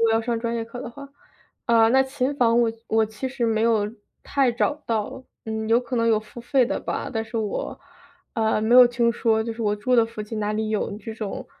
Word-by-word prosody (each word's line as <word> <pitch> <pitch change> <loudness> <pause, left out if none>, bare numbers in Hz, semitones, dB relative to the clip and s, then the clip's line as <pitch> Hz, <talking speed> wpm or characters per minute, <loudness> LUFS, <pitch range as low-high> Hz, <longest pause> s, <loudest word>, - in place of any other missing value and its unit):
果 225 - +2
要 225 - +3
上 230 0 -2
专 235 0 -2
业 230 - -2
课 235 +2 -9
的 235 - -6
话。 280 +3 -11 0.6
啊， 230 -1 +5
那 265 +3 +5
琴 265 +1 -2
房 235 -1 +4
我 230 -1 +2 0.2
我 220 0 +3
其 220 +5 -5
实 255 -2 -2
没 220 -1 +1
有 220 -3 +2 0.4
太 275 -3 +2
找 250 +4 +1
到， 225 +3 -2 0.2
嗯， 220 0 -3
有 230 +1 +5
可 250 +1 -6
能 230 0 +2
有 220 -2 +4
付 215 +2 -11
费 250 +1 +2
的 - - -2
吧， - - -3
但 225 -1 -2
是 225 +1 -7
我， 210 -2 -3 0.5
呃， 220 -1 +1
没 225 +3 +2
有 250 - +10
听 235 -1 +1
说， 220 -1 +1
就 230 - -3
是 230 0 -6
我 210 -1 +1
住 250 +5 0
的 230 - +6
附 225 -1 -8
近 215 +1 -6
哪 210 0 -1
里 215 0 -2
有 215 - -1
这 225 0 -7
种， 215 -3 -5
230 Hz, 260 characters per minute, -24 LUFS, 220-240 Hz, 0.6 s, 有